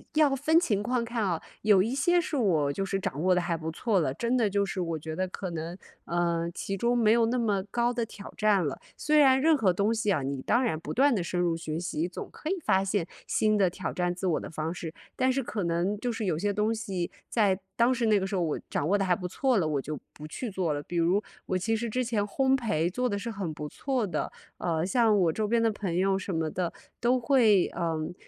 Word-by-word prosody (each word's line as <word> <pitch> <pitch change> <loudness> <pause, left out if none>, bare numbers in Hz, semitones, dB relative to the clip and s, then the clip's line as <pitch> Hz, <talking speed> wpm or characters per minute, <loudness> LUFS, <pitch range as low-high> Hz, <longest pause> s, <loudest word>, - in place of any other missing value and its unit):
要 305 -1 +5
要 270 - 0
分 310 +5 +4
情 210 - 0
况 240 +1 0
看 230 -2 -2
啊。 175 -4 0 0.2
有 205 -3 +5
一 230 +7 -1
些 350 +5 +3
是 345 -2 -2
我 165 - +2
就 195 - -2
是 195 0 -1
掌 150 -5 -3
握 185 - +4
得 180 - +3
还 175 -1 -1
不 160 0 -4
错 200 +2 +1
了， 130 -4 0
真 235 - -1
的 230 -4 +2
就 200 0 +1
是 190 -1 -3
我 165 -2 -2
觉 155 +1 -6
得 185 - 0
可 185 0 -5
能， 165 +2 -5 0.3
呃， 170 -1 0
其 195 - -3
中 235 +5 +1
没 220 -2 +4
有 230 0 +4
那 250 +2 0
么 205 -5 +1
高 240 0 +1
的 235 -1 -1
挑 205 -2 -10
战 205 -5 +3
了。 140 - -4 0.2
虽 305 0 +2
然 265 -3 +6
任 320 +2 +5
何 215 -10 +3
东 200 +5 +1
西 220 -2 0
啊， 155 - +1
你 135 0 -3
当 240 - +2
然 230 -11 0
不 - - -6
断 275 0 +4
地 185 - -1
深 175 +1 -2
入 175 -2 +1
学 165 -1 -4
习， 170 -1 -2
总 - - -7
可 310 - -7
以 385 - +1
发 190 -9 +2
现 195 -3 -1 0.2
新 215 -1 +2
的 190 -3 +4
挑 185 +1 -5
战 175 -1 0
自 185 +1 -3
我 170 - +1
的 - - -7
方 160 +1 -3
式。 165 -2 -6 0.2
但 260 0 +2
是 270 +1 0
可 215 -5 -3
能 175 +4 0
就 245 +2 -1
是 225 -1 -3
有 175 -5 0
些 205 +5 0
东 210 +2 0
西 190 -5 -3 0.2
在 205 -5 +2 0.2
当 235 +2 +4
时 240 -2 0
那 210 -2 +4
个 190 - -2
时 195 - -3
候 185 - +1
我 160 -3 -1
掌 145 - -1
握 205 +4 +3
得 195 - 0
还 180 -1 +3
不 180 0 -5
错 260 +3 +1
了， 180 - +2
我 145 -3 0
就 150 +2 -5 0.2
不 150 - -9
去 230 +8 -5
做 180 -5 -1
了。 145 0 -4
比 175 - -5
如 180 +5 +2 0.2
我 185 - 0
其 225 +5 -1
实 235 +1 -3
之 255 +3 0
前 230 -4 0
烘焙 230 - +1
做 250 +7 -1
得 200 - -1
是 230 +3 -4
很 195 -7 -4
不 150 0 -6
错 260 - -1
的， 185 - -2 0.3
呃， 165 -1 -1
像 220 +1 +3
我 175 -4 +3
周 210 +5 -1
边 230 +1 +2
的 225 - +3
朋 195 -5 -3
友 190 +2 +2
什 190 -2 -4
么 160 -1 0
的， 180 -2 -2 0.3
都 245 +2 +2
会， 230 -5 +4 0.2
嗯， 160 -1 -2
195 Hz, 285 characters per minute, -28 LUFS, 170-235 Hz, 0.3 s, 然